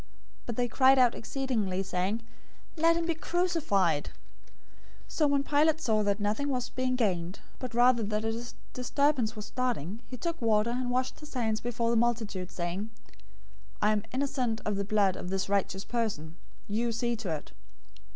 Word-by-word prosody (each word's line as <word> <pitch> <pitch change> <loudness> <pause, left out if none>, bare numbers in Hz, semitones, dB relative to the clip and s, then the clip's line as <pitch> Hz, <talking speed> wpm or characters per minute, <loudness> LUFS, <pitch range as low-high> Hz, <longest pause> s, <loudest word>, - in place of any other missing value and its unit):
But 235 - -3
they 245 +1 +1
cried 265 +2 +5
out 250 -2 +5
exceedingly, 220 -8 -1
saying, 195 +4 -1 0.5
"Let 335 +1 +4
him 335 - -1
be 335 - +1
crucified!" 310 - +1 1.0
027:024 - - -16
So 305 - +2
when 280 -1 +2
Pilate 300 +2 +3
saw 220 -7 +2
that 205 0 +1
nothing 215 +8 0
was 250 -2 -1
being 255 0 0
gained, 185 -6 0 0.2
but 250 -3 -5
rather 245 0 +5
that 210 +1 -1
a 230 +2 -3 0.2
disturbance 250 -2 +1
was 210 -1 -6
starting, 230 - -2
he 250 - -7
took 335 +5 -3
water, 220 0 +3
and 250 0 -1
washed 255 +1 -1
his 300 -2 -11
hands 220 -3 0
before 235 -1 0
the 235 - +3
multitude, 220 -6 0
saying, 185 +4 -3 0.9
"I 210 - +3
am 210 -1 +1
innocent 255 -4 0
of 210 - 0
the 200 - -1
blood 200 -2 +2
of 180 - -6
this 190 0 -1
righteous 195 -1 0
person. 200 -10 -2 0.3
You 230 +3 0
see 235 +1 0
to 215 -5 -4
it." 150 - -9
230 Hz, 170 wpm, -30 LUFS, 205-255 Hz, 1.0 s, cried